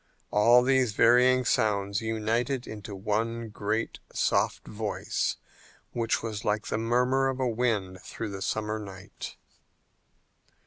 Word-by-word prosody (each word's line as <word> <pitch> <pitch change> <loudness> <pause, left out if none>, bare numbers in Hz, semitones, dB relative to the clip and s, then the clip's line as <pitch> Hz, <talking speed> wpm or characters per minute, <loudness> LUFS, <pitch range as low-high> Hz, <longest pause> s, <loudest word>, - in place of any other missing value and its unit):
All 120 +4 +6
these 130 -3 +2
varying 125 +3 +5
sounds 100 -3 +1
united 115 +4 -1
into 105 -1 -7
one 110 +3 -2
great 105 +2 -2
soft - - 0
voice 105 -1 -2 0.5
which 115 -2 -1
was 110 -2 -4
like 105 +1 0
the 110 - -2
murmur 125 +4 +2
of 130 0 -3
a 130 - +1
wind 110 -6 -1
through 115 +2 -6
the 95 -1 -6
summer 110 +1 -2
night. 95 -3 -9
110 Hz, 125 wpm, -28 LUFS, 105-120 Hz, 0.5 s, All